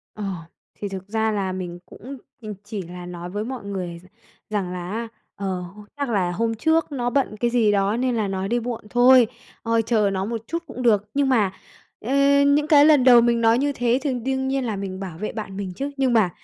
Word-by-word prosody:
Ờ, 210 - -6 0.5
thì 205 - -5
thực 190 0 -7
ra 220 0 0
là 195 -3 -1
mình 175 -2 -5
cũng 270 +4 -10 0.2
mình 210 -2 -6
chỉ 205 -1 -5
là 180 +1 -9
nói 175 0 -7
với 205 +3 -3
mọi 250 -2 -6
người 180 -4 -5
r - - -20 0.4
rằng 195 -4 -2
là 180 +1 -5
á, 230 +1 -3 0.3
ờ, 190 -2 -3
"H - - -13 0.2
chắc 280 -3 -2
là 185 -5 +1
hôm 225 +5 -1
trước 320 +5 +1
nó 245 -3 -1
bận 245 -5 0
cái 240 +1 +1
gì 230 -3 +3
đó 200 +2 +1
nên 250 -1 0
là 215 -3 0
nó 190 0 -3
đi 240 +2 0
muộn 235 -1 -4
thôi. 245 -1 +6 0.4
Ờ, 230 0 +2
chờ 215 -3 +1
nó 190 0 -1
một 225 0 -4
chút 335 +1 -3
cũng 255 - -7
được." 210 -3 +2
Nhưng 280 -1 +1
mà, 210 -7 +3 0.5
ơ, 255 +5 -3 0.3
những 295 +1 +3
cái 295 -3 +7
lần 295 -5 +6
đầu 245 -2 +8
mình 235 0 +2
nói 225 +1 +4
như 285 +2 +1
thế 245 +1 +1
thì 280 -4 -1
đương 265 +2 -2
nhiên 270 -1 0
là 220 -3 -2
mình 195 -1 -5
bảo 180 -5 -7
vệ 215 - -4
bạn 205 -3 -6
mình 190 -3 -4
chứ, 280 +7 -4
nhưng 260 -3 +2
mà 215 -6 +4
225 Hz, 235 wpm, -23 LUFS, 195-250 Hz, 0.5 s, đầu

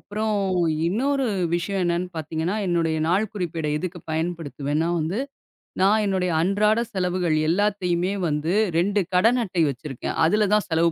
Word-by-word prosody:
அப்புறம் 215 +1 -2 0.5
இன்னொரு 270 +7 0 0.3
விஷயம் 190 +2 -1
என்னன்னு 175 +1 0
பாத்தீங்கன்னா, 160 +5 -2
என்னுடைய 165 -2 +1
நாள்குறிப்பேட 180 -5 -1
எதுக்கு 180 +1 -5
பயன்படுத்துவேன்னா 160 -2 -2
வந்து, 165 +8 -2 0.6
நான் 210 +3 +4
என்னுடைய 185 -2 0
அன்றாட 210 +4 +2
செலவுகள் 180 -3 0
எல்லாத்தையுமே 185 -1 +1
வந்து 155 +4 -1 0.2
2 200 +4 +2 0.2
கடன் 230 +7 +4
அட்டை 180 -3 0
வச்சிருக்கேன். 135 0 -5
அதுல 210 +5 +3
தான் 210 - 0
செலவு 165 0 +2
180 Hz, 125 wpm, -24 LUFS, 165-205 Hz, 0.6 s, நான்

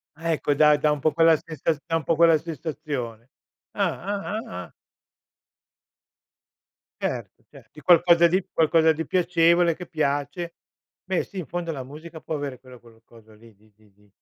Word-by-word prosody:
Ah 165 +2 -3
ecco 145 -1 0
da 150 +1 +5
da 150 +1 +2
un 150 - -1
po' 155 +2 +1
quella 165 0 +5
sensa 160 0 -3
da 165 -1 -1
un 165 - -1
po' 165 - +1
quella 165 0 +5
sensazione. 145 -7 -6 0.4
Ah, - - -1
ah, 200 +2 -3
ah, 90 0 -7
ah. - - -20 2.3
Certo, - - -4
cer - - -16
di 150 - -14
qualcosa 170 +1 +5
di 185 +2 0
qualcosa 160 0 +4
di 160 +1 -4
piacevole, 170 -1 +3
che 180 - -9
piace, 155 +4 -2 0.5
beh 185 -1 -1
sì, 195 - -8
in 165 - -6
fondo 175 -1 -4
la 135 -4 -5
musica 155 +4 -11
può 160 - -4
avere 140 -4 -5
quello 125 -2 -15
cul 115 -1 -20
coso 110 -2 -19
lì, 110 0 -19
di 105 +1 -27
di 105 -1 -26
di 105 +1 -28
155 Hz, 175 wpm, -24 LUFS, 130-170 Hz, 2.3 s, da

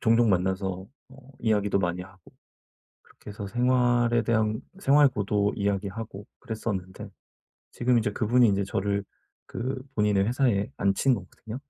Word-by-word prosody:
종종 115 -1 +4
만나서 95 0 -1 0.2
뭐 135 +1 -16
이야기도 105 -3 +1
많이 90 0 -1
하고 95 -2 -17 0.7
그렇게 105 - -13
해서 100 -1 -6
생활에 120 +1 +2
대한 110 -1 0 0.2
생활고도 125 - +3
이야기하고 100 +1 -3
그랬었는데 100 -5 -5 0.6
지금 125 0 +2
이제 105 - -1
그분이 120 +3 +3
이제 100 0 +1
저를 100 +1 -1 0.4
그 130 +2 -4
본인의 105 -2 +2
회사에 120 -3 +1
앉힌 100 +7 +2
거거든요. 110 +4 -8
105 Hz, 320 characters per minute, -26 LUFS, 100-120 Hz, 0.7 s, 종종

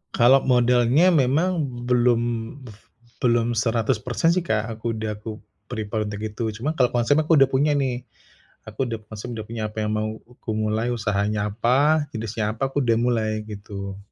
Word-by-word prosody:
Kalau 130 +3 +6
modalnya 125 +7 +4
memang 155 +3 +2 0.2
belum 120 -1 +3 0.4
buf 110 -3 -12 0.4
belum 120 -1 +1
100% 115 +5 +1
sih 175 -1 0
Kak, 110 -2 0
aku 115 0 -2
udah 110 -1 -4
aku 110 0 -8 0.3
prepare 110 -2 -3
untuk 105 0 -5
itu. 110 +2 -4
Cuma 135 +8 -2
kalau 125 -2 +2
konsepnya 145 +6 +2
aku 165 - +3
udah 135 -2 +5
punya 145 +3 +2
nih. 130 -3 -1 0.6
Aku 135 - -2
udah 115 -1 -4
maksudnya 110 +1 -6
udah - - -16
punya 115 -1 -5
apa 110 - -21
yang 105 - -1
mau 110 0 -1 0.3
ku 110 - -3
mulai 110 +2 0
usahanya 105 -1 -1
apa, 140 +8 +2
jenisnya 110 -1 -2
apa, 135 +4 -2
aku 140 0 -1
udah 115 -2 +2
mulai, 115 -3 +1 0.2
gitu. 100 -2 -7
115 Hz, 170 wpm, -23 LUFS, 110-130 Hz, 0.6 s, Kalau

